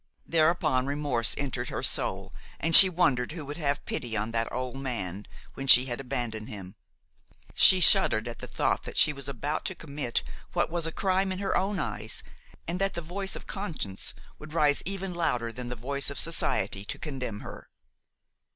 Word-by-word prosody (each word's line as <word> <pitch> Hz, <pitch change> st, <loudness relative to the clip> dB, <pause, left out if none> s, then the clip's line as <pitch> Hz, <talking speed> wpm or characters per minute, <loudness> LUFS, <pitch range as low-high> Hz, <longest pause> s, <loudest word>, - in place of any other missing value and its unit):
Thereupon 155 Hz, -5 st, +1 dB
remorse 140 Hz, -5 st, +2 dB
entered 130 Hz, -3 st, -3 dB
her -, -, -5 dB
soul -, -, 0 dB, 0.3 s
and 165 Hz, 0 st, +5 dB
she 190 Hz, -, +11 dB
wondered 140 Hz, -8 st, 0 dB
who 160 Hz, -3 st, -6 dB
would 145 Hz, +3 st, -7 dB
have 145 Hz, -3 st, -2 dB
pity 115 Hz, -3 st, -4 dB
on 110 Hz, +2 st, -3 dB
that 115 Hz, 0 st, -2 dB
old 130 Hz, +1 st, -5 dB
man 105 Hz, -8 st, -5 dB, 0.3 s
when 135 Hz, -, -6 dB
she 125 Hz, -1 st, +8 dB
had 120 Hz, -1 st, -5 dB
abandoned 120 Hz, -5 st, -4 dB
him. 95 Hz, -3 st, -9 dB, 0.8 s
She 185 Hz, -, +7 dB
shuddered 175 Hz, -, +6 dB
at 120 Hz, -, -8 dB
the -, -, -8 dB
thought -, -, -1 dB
that -, -, -9 dB
she 150 Hz, -, +5 dB
was 140 Hz, -1 st, -6 dB
about 140 Hz, +4 st, -4 dB
to 190 Hz, -, -3 dB
commit 140 Hz, -7 st, -4 dB, 0.3 s
what -, -, 0 dB
was 170 Hz, -1 st, -1 dB
a -, -, -3 dB
crime 190 Hz, +2 st, 0 dB
in 185 Hz, -, -4 dB
her 195 Hz, 0 st, -2 dB
own 195 Hz, +1 st, -1 dB
eyes, 110 Hz, -, -3 dB, 0.4 s
and 175 Hz, +3 st, -3 dB
that 195 Hz, 0 st, -1 dB
the 170 Hz, -, -4 dB
voice 190 Hz, +4 st, -4 dB
of -, -, -9 dB
conscience 160 Hz, -, -5 dB, 0.2 s
would 155 Hz, 0 st, -11 dB
rise 150 Hz, -3 st, +3 dB
even 195 Hz, -1 st, -3 dB
louder 125 Hz, -9 st, -1 dB
than 125 Hz, +1 st, -7 dB
the 125 Hz, -, -5 dB
voice 140 Hz, +4 st, -1 dB
of 140 Hz, -, -7 dB
society, 100 Hz, -, +1 dB
to -, -, -5 dB
condemn 125 Hz, -8 st, -6 dB
her. -, -, -11 dB
140 Hz, 190 wpm, -27 LUFS, 120-170 Hz, 0.8 s, she